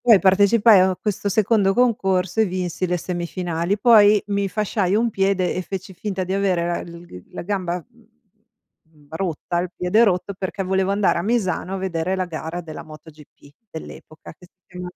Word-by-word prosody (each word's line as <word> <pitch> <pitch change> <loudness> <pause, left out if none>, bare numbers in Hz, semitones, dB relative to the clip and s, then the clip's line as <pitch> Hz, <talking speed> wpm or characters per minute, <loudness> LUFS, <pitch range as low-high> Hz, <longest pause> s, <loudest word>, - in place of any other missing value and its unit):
Poi 230 -4 +8
partecipai 200 +3 +5
a 185 0 +3
questo 210 -1 -2
secondo 205 -1 +2
concorso 195 -6 +1
e 220 - +5
vinsi 185 -1 -3
le 180 0 0
semifinali, 175 +1 -3
poi 210 -2 +6
mi 200 -1 -1
fasciai 200 -2 0
un 230 +2 +1
piede 195 -2 0
e 185 - -2
feci 190 +1 -7
finta 190 0 -4
di 185 +1 -3
avere 190 -3 +1
la 175 0 -2
l 170 0 -11
gr 90 - -12
la - - -5
gamba, 180 -2 -3 1.0
mhmm, 155 -3 -25
rotta, 175 0 -3
il 180 +1 -3
piede 180 +6 +3
rotto, 200 -1 0
perché 190 +1 -4
volevo 190 0 0
andare 200 -3 +1
a - - -1
Misano 195 -3 -1
a - - -3
vedere 185 -1 -2
la 185 -1 -1
gara 165 0 -6
della 160 -2 -9
MotoGP 155 -2 -15 0.2
dell'epoca, 160 -1 -11
che 180 +2 -18
si 185 - -61
chiamava 180 -1 -8
185 Hz, 180 wpm, -21 LUFS, 175-200 Hz, 1.0 s, Poi